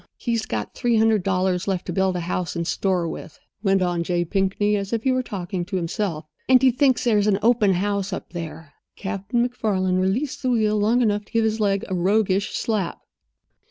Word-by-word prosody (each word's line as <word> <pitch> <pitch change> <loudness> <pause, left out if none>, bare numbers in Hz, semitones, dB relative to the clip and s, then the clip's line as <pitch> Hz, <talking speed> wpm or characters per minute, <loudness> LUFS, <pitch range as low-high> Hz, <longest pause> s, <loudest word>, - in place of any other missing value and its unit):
"He's 230 -2 -2
got 105 -2 -3
three 240 -2 +1
hundred 220 -2 +3
dollars 185 -1 0
left 190 -2 -1
to 175 - -4
build 190 0 +1
a 175 - -2
house 175 -2 -3
and 170 0 -2
store 180 -1 0
with," 160 - -8 0.2
went 195 -2 +2
on 175 -1 0
J. 175 0 0
Pinkney, 195 +3 +1
as 200 -1 -3
if 230 -1 -1
he 265 - +2
were 255 0 +1
talking 185 -6 -4
to 195 - -5
himself. 170 -2 -2 0.2
"And 260 -1 +7
he 260 0 +5
thinks 260 +1 +2
there's 210 -4 +2
an 200 -2 +3
open 225 -4 +4
house 200 +1 -1
up 190 - -6
there." 160 -3 -7 0.2
Captain 205 +5 -1
MacFarland 190 -6 0
released 230 +10 -1
the 255 - 0
wheel 215 -3 +2
long 225 +4 +3
enough 205 -2 0
to - - -24
give 230 -1 +2
his 220 0 0
leg 200 -2 +1
a - - -4
roguish 195 +2 +1
slap. 210 -6 -2
195 Hz, 205 wpm, -23 LUFS, 180-220 Hz, 0.2 s, And